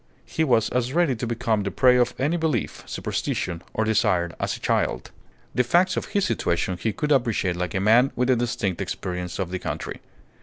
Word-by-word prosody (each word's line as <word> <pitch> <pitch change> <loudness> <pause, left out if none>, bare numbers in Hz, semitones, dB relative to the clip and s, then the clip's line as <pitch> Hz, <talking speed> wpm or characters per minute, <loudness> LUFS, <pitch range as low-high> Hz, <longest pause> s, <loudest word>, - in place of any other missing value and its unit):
He 160 - -1
was 120 -7 +3
as 125 +1 -1
ready 170 -6 +2
to 120 +1 -4
become 115 -2 0
the 100 - -2
prey 125 +4 +4
of 125 -1 +2
any 145 +6 +1
belief, 160 -3 -1
superstition, 85 -2 -3
or 110 - 0
desire 105 -6 +2
as - - -1
a - - -15
child. - - -1 0.4
The 125 - +3
facts 175 +9 +3
of - - -2
his 200 -2 0
situation 90 -5 0
he 110 +5 -1
could 150 +6 -2
appreciate 115 -9 +2
like 90 -1 -3
a - - +2
man 115 +7 +4
with 125 +1 +2
a - - +5
distinct 115 -6 -1
experience 90 -1 -4
of 95 -3 -3
the 95 - -2
country. - - -5
115 Hz, 200 wpm, -24 LUFS, 95-130 Hz, 0.4 s, a